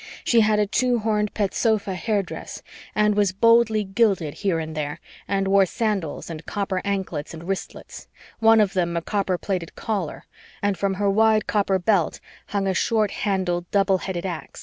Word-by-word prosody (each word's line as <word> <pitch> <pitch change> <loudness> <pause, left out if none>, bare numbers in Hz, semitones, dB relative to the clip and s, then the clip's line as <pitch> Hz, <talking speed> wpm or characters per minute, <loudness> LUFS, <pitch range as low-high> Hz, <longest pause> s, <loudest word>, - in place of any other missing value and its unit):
She 235 -1 +4
had 215 0 +3
a 210 - +3
two 240 +5 +1
horned 210 -1 0
petsofa 205 0 0
hairdress 200 0 -3 0.3
and 210 0 +3
she - - -5
was 200 -2 +2
boldly 230 +1 +4
gilded 195 -6 +1
here 195 -5 -1
and 160 -1 -4
there 150 -1 -3 0.3
and 195 -1 0
wore 195 0 +4
sandals 205 - -2
and 165 -1 -7
copper 195 -2 -2
anklets 190 -6 -3
and 160 - -9
wristlets 190 +1 -6 0.3
one 225 0 +6
of 205 -3 +2
them 170 -2 0
a 165 - -2
copper 195 -2 -1
plated 180 -3 -4
Caller 195 -8 -3 0.4
and 205 -1 0
from 195 0 -1
her 200 +1 0
wide 215 +2 +3
copper 200 -2 +1
belt 190 -2 +1 0.3
hung 200 -1 -1
a 190 - +1
short 215 +1 +1
handled 180 -4 -1
double 195 -2 +2
headed 185 -1 -4
ax. 170 -6 -6
195 Hz, 175 wpm, -23 LUFS, 185-215 Hz, 0.4 s, one